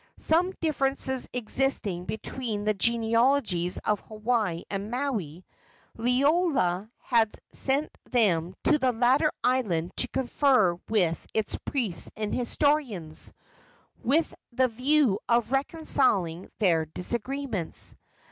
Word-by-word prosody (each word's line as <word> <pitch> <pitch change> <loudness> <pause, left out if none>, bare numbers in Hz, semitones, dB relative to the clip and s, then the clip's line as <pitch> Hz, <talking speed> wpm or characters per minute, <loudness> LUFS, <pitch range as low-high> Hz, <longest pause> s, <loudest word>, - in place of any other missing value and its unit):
Some 345 +4 +2
differences 270 -4 0
existing 230 -6 0
between 220 -1 -4
the 215 0 +1
genealogies 230 -4 +2
of 210 -1 +1
Hawaii 215 -5 -2
and 200 +1 -4
Maui, 220 - -3 0.5
Liloa 250 - +1
had 225 -3 +1 0.2
sent 280 +3 0
them 185 -7 +1
to 300 - +3
the 260 -2 +2
latter 255 +6 +3
island 190 -10 0
to 250 - +2
confer 255 - +2 0.2
with 180 -7 0
its 220 -2 0
priests 220 - 0
and 215 -1 -3
historians, 245 - -1 0.7
with 310 +7 +1 0.2
the 255 +1 +2
view 250 -2 +2
of 235 0 +2
reconciling 265 - +1
their 165 -6 +2
disagreements. 235 - -1
235 Hz, 105 wpm, -27 LUFS, 195-270 Hz, 0.7 s, to